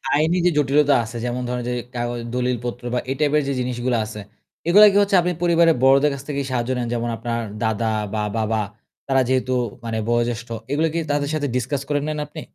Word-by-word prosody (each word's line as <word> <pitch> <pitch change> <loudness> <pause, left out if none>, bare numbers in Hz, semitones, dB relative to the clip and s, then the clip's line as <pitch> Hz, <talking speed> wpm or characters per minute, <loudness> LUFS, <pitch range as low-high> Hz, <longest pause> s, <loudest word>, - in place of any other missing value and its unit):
আইনি 160 +4 +2
যে - - +6
জটিলতা 145 0 +3
আছে 115 +2 -7
যেমন 125 +1 -2
ধরেন 125 -1 -2
যে - - -1 0.2
কাগজ 120 0 -2
দলিলপত্র 125 -1 -2
বা 125 - +1
এই 135 - 0
টাইপের 150 0 +3
যে 140 - 0
জিনিসগুলা 125 -1 -1
আছে, 105 0 -8 0.5
এগুলো 205 +5 +8
কি 200 - +2
হচ্ছে 200 -1 +2
আপনি 180 - 0
পরিবারের 170 -1 +4
বড়দের 135 +2 +5
কাছ 135 - -6
থেকেই 140 -2 -2
সাহায্য 120 -1 -1
নেন 120 - -2
যেমন 120 0 -1
আপনার 115 +1 -3 0.2
দাদা 110 0 0 0.3
বা 110 - -1 0.2
বাবা 110 0 0 0.5
তারা 135 -1 +3
যেহেতু 130 0 +1 0.6
বয়োজ্যেষ্ঠ, 120 0 0 0.2
এগুলো 155 +3 +2
কি 170 - 0
তাদের 145 -1 0
সাথে 150 -2 -1
ডিসকাস 130 +3 -1
করে 145 - +1
নেন 155 0 -2
আপনি? 155 +1 -8
130 Hz, 195 wpm, -22 LUFS, 120-150 Hz, 0.6 s, এগুলো